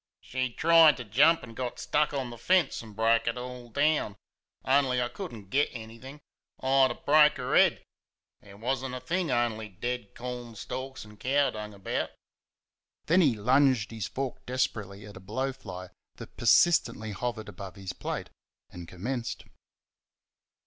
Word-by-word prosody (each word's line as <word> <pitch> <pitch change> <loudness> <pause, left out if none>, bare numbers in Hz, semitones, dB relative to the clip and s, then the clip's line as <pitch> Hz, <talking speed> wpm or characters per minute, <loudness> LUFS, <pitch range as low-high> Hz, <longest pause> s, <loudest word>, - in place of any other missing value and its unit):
"She 130 0 -2
tried 165 +3 +6
to 125 - -6
jump 145 +10 +4
and 115 -2 -10
got 125 -1 -4
stuck 150 0 +1
on 135 -4 -3
the 120 - -9
fence, 180 +3 +2
and 110 -3 -12
broke 115 +1 +2
it 115 - 0
all 125 -1 -7
down. 145 -5 +1 0.5
On'y 130 -2 +3
I 120 - +1
could 190 +3 -7
n't 100 -4 -12
get 145 +2 +2
anything, 120 +5 -10 0.4
I'd 135 0 +4
er - - -4
broke 150 0 +5
'er 125 -1 -1
head - - +4 0.6
there 100 -1 -15
was 130 +4 -2
n't 130 -1 -4
a - - -4
thing, 175 +3 -1
on'y 115 -3 0
dead 120 +3 -5
cornstalks 125 +1 -6
and 105 -1 -16
cow 140 +4 +2
dung 105 -1 -7
about." 100 - -2 1.0
Then 175 +4 +4
he 140 -9 +4
lunged 125 0 +3
his 110 -4 -4
fork 135 -1 -5
desperately 105 -6 -2
at 105 -2 -11
a - - -11
blowfly 105 -4 -5 0.3
that - - -11
persistently 115 -3 +3
hovered 110 +2 -4
about 100 -1 -9
his 95 -2 -6
plate, - - -5 0.4
and 85 -1 -9
commenced. 115 +8 -4
125 Hz, 160 wpm, -28 LUFS, 110-135 Hz, 1.0 s, tried